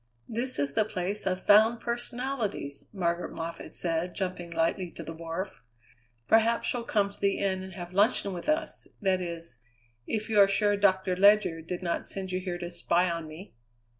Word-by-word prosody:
"This 245 +3 0
is 140 0 +1
the 215 - +4
place 200 0 -3
of 185 0 -1
Found 220 +3 +6
Personalities," 240 - -3
Margaret 175 -3 -1
Moffatt 165 +1 -5
said, 170 +1 -1
jumping 180 -3 -3
lightly 170 +2 0
to - - -9
the 165 - -6
wharf. 165 +4 -5 0.7
"Perhaps 225 +1 +3
you'll 240 -2 -3
come 200 -3 +1
to - - -16
the 200 -1 +1
inn 190 -1 0
and 190 -1 -9
have 175 -1 -7
luncheon 200 0 +2
with 180 - -5
us 310 +1 -1
that 190 -3 +1
is, 170 -8 -5 0.5
if 215 -1 -1
you 215 -2 +2
are 200 - +8
sure 205 +1 +2
Doctor 190 -2 +2
Ledyard 190 -4 +4
did 180 0 -4
not 170 -1 -1
send 190 -1 -5
you 185 - 0
here 180 -1 -4
to 175 0 -6
spy 175 +1 +1
on 165 -1 -4
me." 160 +6 -11
190 Hz, 185 wpm, -29 LUFS, 170-210 Hz, 0.7 s, are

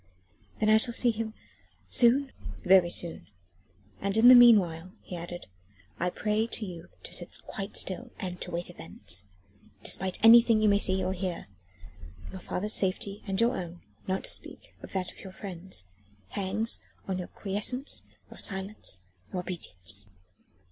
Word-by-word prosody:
"Then 215 - +1
I 215 - +7
shall 235 +2 +2
see 240 - +3
him... 220 0 -5 0.5
soon?" 260 +3 +3 0.3
"Very 185 -2 +5
soon. 170 -1 -4 0.7
And 200 +2 -1
in 235 +3 +8
the - - +11
meanwhile," 190 -8 +6
he 180 - -7
added, 175 +1 -7 0.5
"I 180 - +1
pray 215 +4 -1
you 175 -6 -7
to - - -7
sit - - -2
quite 195 0 -4
still 235 +7 -3
and 180 -3 -5
to - - -3
wait 175 0 -4
events... 90 - +1 0.6
despite 190 -1 +1
anything 230 -1 +8
you 215 -1 +4
may 200 0 +4
see 190 -1 +2
or 185 +1 -1
hear. 180 -2 -4 0.9
Your 190 - -8
father's 210 +5 -2
safety 195 +1 0
and 195 -1 -2
your 235 +2 +3
own 175 -1 -7 0.2
not 190 0 -1
to - - +3
speak - - -5
of - - -10
that 185 -2 -2
of - - -18
your 190 -2 -10
friends 185 - -5 0.4
hangs 200 - -1 0.3
on 190 -1 -2
your 180 - -5
quiescence, 210 +7 -1 0.3
your - - -12
silence, 190 - -2 0.3
your 180 - -2
obedience." 100 - -4
190 Hz, 155 wpm, -29 LUFS, 180-215 Hz, 0.9 s, the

